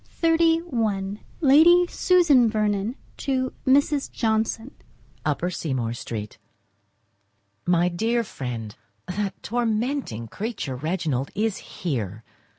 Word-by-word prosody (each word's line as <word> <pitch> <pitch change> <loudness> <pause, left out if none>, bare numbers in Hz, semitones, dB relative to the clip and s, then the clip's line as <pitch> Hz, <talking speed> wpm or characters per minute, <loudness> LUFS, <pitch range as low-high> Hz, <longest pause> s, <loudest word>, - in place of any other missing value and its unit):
VERNON 330 0 +3
XXXI 205 -4 -1 0.2
Lady 330 +5 +7
Susan 235 - +3 0.2
to 260 -2 -1
Mrs. 280 +1 +3
Johnson. 225 +2 -1 0.5
Upper 155 +4 0
Seymour 130 -9 -2
Street. 110 -3 -6 1.3
My 175 0 +3
dear 225 +7 0
Friend,—That 135 - -6
tormenting 230 - -1
creature, 200 - -4
Reginald, 150 -2 -2
is 215 0 0
here. 115 - -4
210 Hz, 85 wpm, -24 LUFS, 155-260 Hz, 1.3 s, Lady